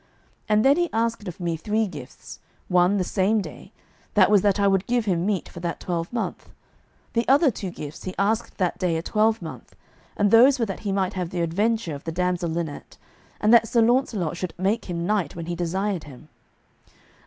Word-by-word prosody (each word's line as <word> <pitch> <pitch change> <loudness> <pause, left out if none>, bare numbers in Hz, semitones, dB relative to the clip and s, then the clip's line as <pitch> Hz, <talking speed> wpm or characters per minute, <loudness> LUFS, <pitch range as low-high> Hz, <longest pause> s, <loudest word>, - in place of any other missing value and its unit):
And 215 +2 +3
then 275 +2 +5
he 350 -1 +1
asked 225 -2 -1
of 180 +2 -7
me 170 -2 -1
three 210 +7 0
gifts, 150 -10 -10 0.3
one 180 +2 +3
the 185 - +1
same 195 +4 +1
day, 200 - -8 0.4
that - - +5
was 205 -2 +6
that 205 0 +2
I 200 - +3
would 195 -1 +1
give 240 -2 +1
him 180 -2 0
meat 205 -4 -1
for - - -10
that 170 -1 -4
twelvemonth. 175 +7 -4 0.6
The 230 0 0
other 280 +2 +5
two 195 -3 -5
gifts 150 -3 -8
he 185 - -5
asked 215 +4 0
that 180 -3 -1
day 175 -3 0
a 160 - -4
twelvemonth, 215 -6 -1 0.4
and 205 -1 +2
those 255 +5 +7
were 235 - 0
that 195 -3 -5
he 205 - -3
might 195 -1 0
have 180 -3 -3
the 175 -1 -3
adventure 200 +2 0
of 140 - -9
the 165 - -3
damsel 180 0 -1
Linet, 160 -2 -5 0.4
and 215 +2 +3
that 225 -1 +6
Sir 230 +1 +3
Launcelot 225 - +1
should 180 -2 -5
make 195 +5 0
him 170 -2 -3
knight 200 -6 0
when 165 -1 -6
he 175 +1 -3
desired 180 +1 -2
him. 150 +2 -13
195 Hz, 200 wpm, -24 LUFS, 170-220 Hz, 0.6 s, those